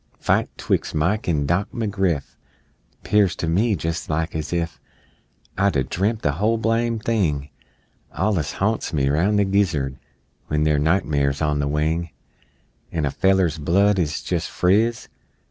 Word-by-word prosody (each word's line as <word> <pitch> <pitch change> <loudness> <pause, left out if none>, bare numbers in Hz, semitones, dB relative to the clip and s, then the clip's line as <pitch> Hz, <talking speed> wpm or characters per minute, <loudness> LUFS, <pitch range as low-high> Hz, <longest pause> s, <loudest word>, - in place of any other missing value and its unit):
Fight - - +1
'twixt - - -1
Mike 90 +7 0
an' 75 -4 +1
Dock 90 +7 0
McGriff 95 - -1 0.7
'Pears 100 -4 +3
to 85 - -3
me 100 +7 +2
jes' 80 0 -3
like 80 +1 -1
as 80 -1 -4
if 85 -1 -2 0.8
I'd 100 -3 +2
a 65 - +2
dremp' 105 - -1
the 70 - +2
whole 105 +9 +1
blame 115 +1 0
thing 85 -11 -1 0.6
Allus 90 -7 -1
ha'nts 110 -2 -1
me 70 -3 +1
roun' 85 +9 +2
the 100 -1 +3
gizzard 85 -10 0 0.5
When 75 0 0
they're 75 -1 +2
nightmares 75 -4 +1
on 75 -1 +1
the 70 - 0
wing, 80 +3 0 0.8
An' 80 -3 -1
a 70 - -1
feller's 95 -4 +2
blood 95 +6 +3
's 75 -3 -2
jes' - - 0
friz! 110 +6 +1
85 Hz, 150 wpm, -22 LUFS, 75-100 Hz, 0.8 s, Pears